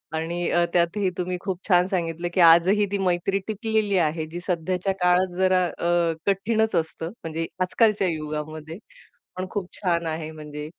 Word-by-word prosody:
आणि 170 +2 -2
अ, 175 0 +3
त्यातही 180 +3 +2
तुम्ही 180 0 -2
खूप 190 -1 -5
छान 180 -1 +4
सांगितलं 170 -2 -2
की 185 - +3
आजही 175 +5 +6
ती 200 - 0
मैत्री 190 +1 0
टिकलेली 215 -2 0
आहे, 160 -2 0
जी 165 +3 -7
सध्याच्या 180 +2 -1
काळात 180 0 +3
जरा 185 -1 +3
अ, 170 -1 +1
कठीणच 220 +2 +1
असतं 165 0 -2
म्हणजे 165 0 -3 0.2
आजकालच्या 210 0 +2
युगामध्ये, 155 +1 -5 0.6
पण 185 - -2
खूप 200 -4 -3
छान 170 -3 -1
आहे. 160 0 -3
म्हणजे 150 -1 -8
175 Hz, 155 wpm, -24 LUFS, 165-190 Hz, 0.6 s, आजही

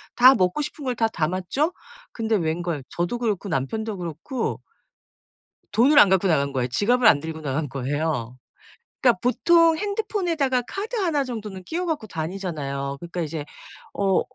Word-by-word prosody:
다 255 +2 +8
먹고 185 +9 +1
싶은 290 0 -6
걸 250 - -1
다 225 -1 +2
담았죠? 185 - -1 0.4
근데 225 -1 0
웬걸. 165 -3 -1
저도 175 +7 -2
그렇고 215 -4 -1
남편도 210 - -2
그렇고 175 - -4 1.1
돈을 275 +6 +5
안 205 - +8
갖고 190 0 +3
나간 140 -5 +2
거예요. 130 -2 -1
지갑을 220 - +2
안 145 -9 +7
들고 160 +1 -6
나간 145 +2 -2
거예요. 135 -2 -2 0.7
그러니까 - - +4
보통 330 +6 +4
핸드폰에다가 360 - 0
카드 430 +5 -4
1 335 -10 +1
정도는 215 -7 -6
끼워 350 - -3
가지고 310 -10 -2
다니잖아요. 155 -6 -4
그러니까 175 +1 -5
이제 155 -2 -4 0.5
어 195 -2 +2
195 Hz, 335 characters per minute, -24 LUFS, 160-260 Hz, 1.1 s, 다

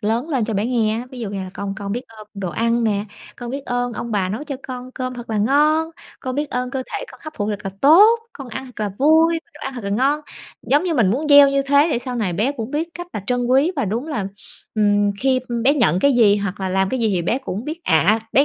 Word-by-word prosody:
lớn 230 +7 -1
lên 260 -8 0
cho 220 -1 -3
bé 205 +4 0
nghe 225 -3 +1
á. 245 - -6
Ví 255 -2 -9
dụ 210 -3 -4
như 200 - -5
là 185 - -7
"Con 200 -1 -4
con 200 -1 -4
biết 245 +3 -3
ơn 215 -1 -13
đồ 190 -3 -4
ăn 230 +6 0
nè, 205 -1 0 0.3
con 240 -1 -6
biết 275 +1 -5
ơn 245 -1 -2
ông 230 +2 -5
bà 190 -3 0
nấu 220 +9 -4
cho 280 -3 -5
con 255 0 -7
cơm 255 0 -4
thật 240 -1 -8
là 215 - 0
ngon, 300 +8 +3 0.3
con 255 -1 -4
biết 295 0 -2
ơn 250 0 -2
cơ 265 -1 -3
thể - - -3
con - - -15
hấp 310 - -7
phụ 205 0 -1
thật 205 - -3
là 195 - -3
tốt, 410 +11 +7
con 275 -3 -9
ăn 260 +3 -6
thật 245 -3 -11
là 205 -1 -1
vui, 320 +3 +4
đồ 300 - -14
ăn 270 0 -4
thật 240 -5 -7
là 200 - -2
ngon", 275 +8 +1 0.4
giống 290 +6 +2
như 340 -3 0
mình 215 -8 +3
muốn 295 +7 -1
gieo 285 -1 +8
như 275 0 +1
thế 285 +3 +4
để - - +1
sau 250 0 -5
này 200 -6 -1
bé 225 +10 0
cũng 235 -2 -6
biết 315 +3 -2
cách 350 0 -6
là 210 - -4
trân 245 -1 0
quý 275 +8 +3
và - - 0
đúng 230 +9 -2
là, 215 -10 -2 0.5
ừm, 205 -1 +3
khi 260 -1 +2 0.2
bé 280 +3 +5
nhận 185 - +2
cái 280 +7 +3
gì 215 -4 +5
hoặc 200 -1 -4
là 190 - -1
làm 190 +1 +1
cái 260 +4 -2
gì 225 - +2
thì 180 -3 0
bé 235 +9 0
cũng 230 -5 -5
biết 320 +4 -5
ạ, 215 +2 +3
bé 275 - +5
245 Hz, 285 wpm, -20 LUFS, 210-280 Hz, 0.5 s, gieo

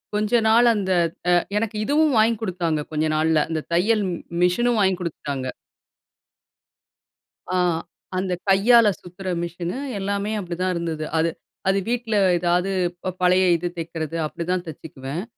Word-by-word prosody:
கொஞ்ச 215 +3 +2
நாள் 235 +2 +5
அந்த, 190 -2 -1 0.4
அ - - +5 0.2
எனக்கு 220 0 -1
இதுவும் 300 +1 +3
வாங்கிக் 225 0 +3
குடுத்தாங்க. 170 -6 -1
கொஞ்ச 155 0 0
நாள்ல. 160 0 +3
அந்த 160 -2 -2
தையல் 210 +5 +2
ம் - - -2 0.3
மிஷினும் 230 +6 +2
வாங்கிக் 190 -1 +2
குடுத்துட்டாங்க. 145 -6 -4 2.1
ஆ - - +2 0.6
அந்த 185 -1 -1 0.2
கையால 225 +4 +6
சுத்துற 180 +2 -10 0.2
மிஷினு, 175 +5 -4 0.2
எல்லாமே 200 +2 -2
அப்படிதான் 180 0 -2
இருந்தது. 165 -2 -3
அது, 165 +1 +2 0.4
அது 195 +1 +3
வீட்ல 235 -2 -1 0.2
ஏதாவது 180 +2 +1 0.3
ப 185 - -2
பழைய 185 +1 +4
இது 175 +2 -3
தெக்கிறது, 165 -1 -4
அப்படிதான் 180 +3 -3
தச்சிக்குவேன். 145 +1 -6
180 Hz, 135 wpm, -23 LUFS, 165-210 Hz, 2.1 s, கையால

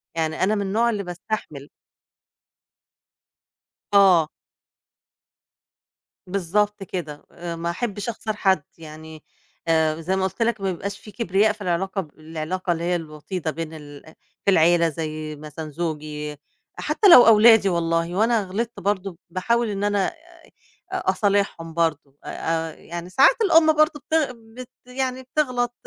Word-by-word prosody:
يعني 160 +1 -1
أنا 210 +3 +2
من 205 - -1
النوع 220 +5 +1
اللي 210 -3 -2
باستحمل. 175 -5 -6 2.2
آه. 180 -6 +6 2.0
بالضبط 200 +2 0
كده، 160 -6 -6
آآ 170 -1 -6
ما 170 +1 -3
أحبّش 205 +3 -3
أخسر 220 -1 -4
حد. 190 -6 +2
يعني 155 -1 -11 0.4
آآ 160 -1 +2
زي 185 +4 -1
ما 190 - 0
قُلت 190 +5 -3
لَك 230 -3 +1
ما 195 - 0
يبقاش 200 +3 -5
في 210 - -13
كبرياء 205 0 +1
في 215 - -18
العلاقة، 190 +2 -1
ب 155 -3 -16
العلاقة 165 +4 -4
اللي 170 0 -2
هي 175 +1 +1
الوطيدة 160 +1 -5
بين 160 0 -6
ال 145 -2 -11 0.4
في 200 - +5
العيلة 170 -1 +4
زي 155 0 -5
مثلًا 155 +1 -8
زوجي 150 -2 -5 0.4
حتّى 410 - +2
لو 250 -9 +10
أولادي 225 -2 +7
والله 165 0 0
وأنا 220 +1 +2
غلطت 225 +5 -4
برضه 195 -2 -2
باحاول 230 +6 0
إن 200 0 -3
أنا 205 -2 +1
أ - - -3 0.8
أصالحهم 200 - 0
برضه. 150 -4 -1
أ 165 0 -2
أ - - -10
يعني 170 +1 -8
ساعات 270 - +5
الأم 325 -5 +5
برضه 310 0 +3
بتغ 315 -5 +1
بت 235 +1 -12 0.2
يعني 260 0 -3
بتغلط 250 -3 -1
185 Hz, 140 wpm, -23 LUFS, 160-215 Hz, 2.2 s, لو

